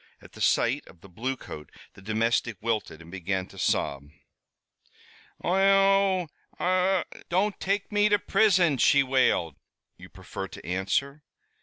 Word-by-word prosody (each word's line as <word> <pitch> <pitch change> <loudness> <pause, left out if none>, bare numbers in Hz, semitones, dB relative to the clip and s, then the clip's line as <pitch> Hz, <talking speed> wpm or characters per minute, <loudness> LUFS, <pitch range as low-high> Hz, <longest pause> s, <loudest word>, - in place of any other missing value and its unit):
At - - -16
the - - -12
sight - - +2
of 85 - -17
the - - -14
bluecoat 110 - -6 0.2
the - - -16
domestic 115 +1 0
wilted 110 -8 -3
and 85 - -14
began 95 0 -3
to - - -13
sob. 70 +1 -1 1.3
"Ohone! 195 -1 +3 0.3
Ohone! 185 0 +2 0.3
don't 195 +4 0
take 200 +2 -2
me 205 0 +3
to 205 - +4
prison!" 190 -9 +3
she 140 -1 +5
wailed. 130 - +1 0.4
"You 90 0 -13
prefer 95 0 -7
to 80 - -12
answer?" 100 - -1
135 Hz, 135 wpm, -26 LUFS, -, 1.3 s, she